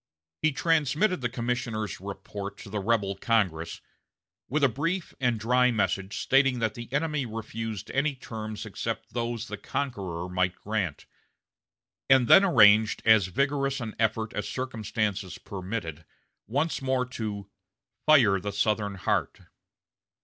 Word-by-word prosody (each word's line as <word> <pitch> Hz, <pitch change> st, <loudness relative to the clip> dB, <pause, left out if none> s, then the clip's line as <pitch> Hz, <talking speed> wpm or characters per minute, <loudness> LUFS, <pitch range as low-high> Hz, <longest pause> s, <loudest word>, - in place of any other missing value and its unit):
He 155 Hz, -, +3 dB
transmitted 160 Hz, +4 st, +1 dB
the 120 Hz, -, 0 dB
commissioners' 120 Hz, -4 st, -3 dB
report 100 Hz, +1 st, -7 dB
to 100 Hz, -, -11 dB
the 105 Hz, -, -2 dB
rebel 100 Hz, -1 st, +1 dB
Congress, 95 Hz, -8 st, 0 dB, 0.7 s
with 145 Hz, +2 st, 0 dB
a -, -, +7 dB
brief 165 Hz, -, -2 dB
and 120 Hz, -4 st, +1 dB
dry 125 Hz, +3 st, +3 dB
message 100 Hz, -3 st, -1 dB
stating 135 Hz, -1 st, +3 dB
that 110 Hz, -2 st, 0 dB
the 120 Hz, 0 st, -9 dB
enemy 150 Hz, 0 st, 0 dB
refused 110 Hz, -1 st, -5 dB
any 140 Hz, +1 st, +1 dB
terms 110 Hz, -4 st, -6 dB
except -, -, -5 dB
those 120 Hz, -1 st, -2 dB
the -, -, -5 dB
conqueror 100 Hz, -11 st, -3 dB
might 90 Hz, 0 st, 0 dB
grant; 100 Hz, -8 st, -3 dB, 1.0 s
and 130 Hz, -2 st, +6 dB
then 195 Hz, -, +8 dB
arranged 110 Hz, -, +5 dB
as 110 Hz, -4 st, +6 dB
vigorous 140 Hz, +5 st, 0 dB
an 115 Hz, -3 st, -5 dB
effort 110 Hz, 0 st, 0 dB
as 105 Hz, -, -3 dB
circumstances 110 Hz, -6 st, -3 dB
permitted 90 Hz, -5 st, -5 dB, 0.4 s
once 145 Hz, +8 st, -1 dB
more 130 Hz, -1 st, +1 dB
to 105 Hz, -5 st, -5 dB, 0.6 s
"fire 120 Hz, -11 st, +6 dB
the 100 Hz, +3 st, -4 dB
Southern 105 Hz, 0 st, 0 dB
heart." 95 Hz, -, -1 dB
115 Hz, 135 wpm, -27 LUFS, 100-130 Hz, 1.0 s, then